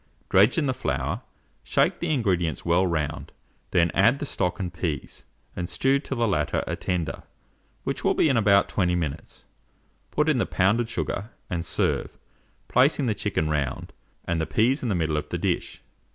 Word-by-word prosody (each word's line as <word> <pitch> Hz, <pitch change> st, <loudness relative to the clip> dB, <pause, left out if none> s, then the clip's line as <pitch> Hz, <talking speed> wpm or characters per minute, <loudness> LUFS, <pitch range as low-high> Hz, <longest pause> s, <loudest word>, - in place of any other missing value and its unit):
Dredge 100 Hz, -, +5 dB
in 160 Hz, -, +2 dB
the 130 Hz, -, +1 dB
flour, -, -, -2 dB, 0.4 s
shake -, -, +1 dB
the -, -, -2 dB
ingredients 90 Hz, -, 0 dB
well 85 Hz, +2 st, +3 dB
round, 75 Hz, -3 st, -2 dB, 0.4 s
then 85 Hz, -2 st, +3 dB
add 100 Hz, +7 st, +4 dB
the 145 Hz, -, -4 dB
stock 90 Hz, -8 st, -1 dB
and 90 Hz, -2 st, -3 dB
peas, 80 Hz, -5 st, -4 dB, 0.3 s
and 90 Hz, -1 st, -4 dB
stew 135 Hz, +1 st, +2 dB
till 135 Hz, -2 st, -5 dB
the 115 Hz, -1 st, +2 dB
latter 75 Hz, -8 st, 0 dB
are -, -, -2 dB
tender, 85 Hz, -6 st, -2 dB, 0.6 s
which -, -, -3 dB
will -, -, +2 dB
be -, -, +4 dB
in 135 Hz, -, +2 dB
about 100 Hz, -3 st, +4 dB
20 90 Hz, -3 st, +1 dB
minutes; 80 Hz, -3 st, -5 dB, 0.6 s
put 150 Hz, +1 st, +1 dB
in 150 Hz, -5 st, +3 dB
the -, -, 0 dB
pounded 110 Hz, +5 st, +2 dB
sugar, 110 Hz, -2 st, -3 dB, 0.2 s
and 85 Hz, -2 st, -1 dB
serve, 80 Hz, -2 st, -1 dB, 0.5 s
placing 135 Hz, +2 st, +3 dB
the 115 Hz, -, +1 dB
chicken 100 Hz, -6 st, -1 dB
round, 70 Hz, -4 st, -2 dB, 0.3 s
and 85 Hz, -1 st, 0 dB
the 80 Hz, -, -2 dB
peas 130 Hz, +6 st, +2 dB
in 125 Hz, -, -2 dB
the 100 Hz, -, +1 dB
middle 80 Hz, -3 st, 0 dB
of 75 Hz, -, -4 dB
the -, -, -2 dB
dish. -, -, -2 dB
95 Hz, 180 wpm, -25 LUFS, 85-120 Hz, 0.6 s, Dredge